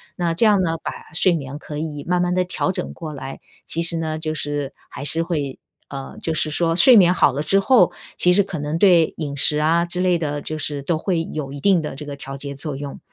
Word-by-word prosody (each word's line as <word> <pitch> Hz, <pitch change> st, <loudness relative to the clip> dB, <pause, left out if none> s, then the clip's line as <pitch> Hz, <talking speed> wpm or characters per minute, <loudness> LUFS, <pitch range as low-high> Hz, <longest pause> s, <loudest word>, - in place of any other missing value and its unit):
那 170 Hz, -2 st, -1 dB
这 225 Hz, -, +2 dB
样 205 Hz, -3 st, +4 dB
呢， 165 Hz, -2 st, -1 dB
把 -, -, -3 dB, 0.2 s
睡 180 Hz, +2 st, +4 dB
眠 140 Hz, -3 st, -4 dB
可 150 Hz, -1 st, -7 dB
以 150 Hz, -2 st, -5 dB
慢 180 Hz, 0 st, +1 dB
慢 180 Hz, 0 st, 0 dB
的 185 Hz, -, +2 dB
调 185 Hz, +1 st, -1 dB
整 -, -, -5 dB
过 160 Hz, -3 st, -7 dB
来， 135 Hz, -1 st, -8 dB, 0.3 s
其 165 Hz, -, -2 dB
实 170 Hz, 0 st, +4 dB
呢， 155 Hz, -1 st, -3 dB
就 155 Hz, -1 st, -3 dB
是 145 Hz, -1 st, -3 dB, 0.2 s
还 -, -, -8 dB
是 160 Hz, +4 st, -1 dB
会 150 Hz, -6 st, -3 dB, 0.3 s
呃， 135 Hz, -1 st, -8 dB
就 165 Hz, -, -2 dB
是 155 Hz, 0 st, 0 dB
说 165 Hz, +2 st, +1 dB
睡 250 Hz, +7 st, +7 dB
眠 180 Hz, -3 st, +6 dB
好 145 Hz, -6 st, +3 dB
了 140 Hz, -, -2 dB
之 195 Hz, +5 st, +3 dB
后， 195 Hz, -3 st, +4 dB, 0.2 s
其 180 Hz, -, +3 dB
实 200 Hz, +2 st, +5 dB
可 180 Hz, -4 st, -6 dB
能 150 Hz, +2 st, -2 dB
对 170 Hz, -3 st, +4 dB
饮 145 Hz, -3 st, -4 dB
食 150 Hz, +2 st, +4 dB
啊 165 Hz, +3 st, +2 dB
之 180 Hz, +1 st, -1 dB
类 180 Hz, -1 st, +2 dB
的， 145 Hz, -2 st, -3 dB
就 155 Hz, +2 st, -5 dB
是 145 Hz, -2 st, -2 dB
都 160 Hz, +2 st, 0 dB
会 165 Hz, -1 st, -1 dB
有 150 Hz, -4 st, -5 dB
一 140 Hz, -, -7 dB
定 185 Hz, 0 st, +3 dB
的 150 Hz, -3 st, -5 dB
这 150 Hz, +1 st, -8 dB
个 145 Hz, -, -6 dB
调 135 Hz, 0 st, -8 dB
节 140 Hz, 0 st, -6 dB
作 145 Hz, 0 st, -5 dB
用。 140 Hz, 0 st, -7 dB
160 Hz, 270 characters per minute, -21 LUFS, 145-175 Hz, 0.3 s, 睡